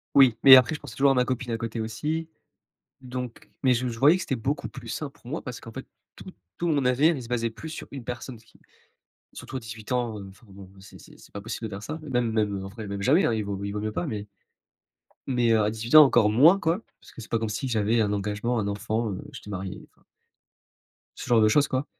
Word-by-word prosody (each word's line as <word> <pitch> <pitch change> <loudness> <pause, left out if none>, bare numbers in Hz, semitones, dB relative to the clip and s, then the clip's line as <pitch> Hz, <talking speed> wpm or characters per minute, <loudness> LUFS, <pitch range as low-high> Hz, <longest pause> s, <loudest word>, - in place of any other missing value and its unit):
Oui, 130 -5 +6
mais 135 -1 +11
après, 130 +3 +4
je 150 - -7
pensais - - -10
toujours 140 0 +4
à - - 0
ma 125 -1 +3
copine, 125 -1 -3
à - - 0
côté, 115 0 -4
aussi, 155 +9 -3 0.7
donc 125 -2 -7
mais 130 -2 +4
je 125 +2 -1
je 115 -2 -5
voyais 145 +6 +6
que - - -6
c'était 135 - -2
beaucoup 135 +5 -3
plus 125 -4 -11
sain 145 +6 -4
pour 120 - -20
moi 155 +6 -4
parce 125 -2 -7
qu'en 115 - -11
fait, - - -8 0.3
tout - - -11 0.3
tout 175 - -2
mon 145 -5 +1
avenir, 140 +7 +3
il 135 - -6
se - - -10
basait 115 -1 -1
plus 135 +8 -9
sur 160 - -8
1 135 -3 -7
personne, 120 0 -7
ce 110 - -24
qui - - -24 0.7
surtout 130 - -8
à - - -3
18 110 0 -8
ans, 120 -4 -1
heu, 100 - -8
enfin, 95 +5 -18
bon, 95 -1 -12
c'est 95 - -14
c'est - - -16
c'est - - -18
pas 100 - -6
possible 115 +2 -5
de - - -11
faire 100 0 -7
ça, 155 +2 -6
même 120 -3 0
même, 105 -3 -1
en - - -6
vrai, 105 +1 -8
même 100 0 -4
jamais, 150 - +4
hein, - - +2
il 110 -1 -1
vaut 100 -1 -4
il 100 - -3
vaut 105 +1 -4
mieux 110 0 -3
pas, 175 - -2
mais 105 -7 -5 1.0
mais, 120 -3 +2
heu, 110 - +4
à 105 - +1
18 110 +3 -4
ans, 155 - +12
encore 120 -6 +4
moins 150 - +6
quoi, 170 +1 0 0.2
parce - - -17
que - - -11
c'est 110 - -11
pas 115 - +1
comme 110 0 -2
si 130 +6 -3
j'avais 115 0 +1
un 105 -2 +1
engagement, 105 +4 -2
un 105 - -1
enfant, 110 +2 -2
heu, 95 - -5
que - - -21
j'étais 105 - -10
marié, 95 +1 -5
enfin - - -31 1.1
ce - - -7
genre 120 -3 +4
de 110 - +5
choses, 145 +6 +3
quoi. 130 +2 -1
115 Hz, 265 wpm, -26 LUFS, 105-130 Hz, 1.1 s, ans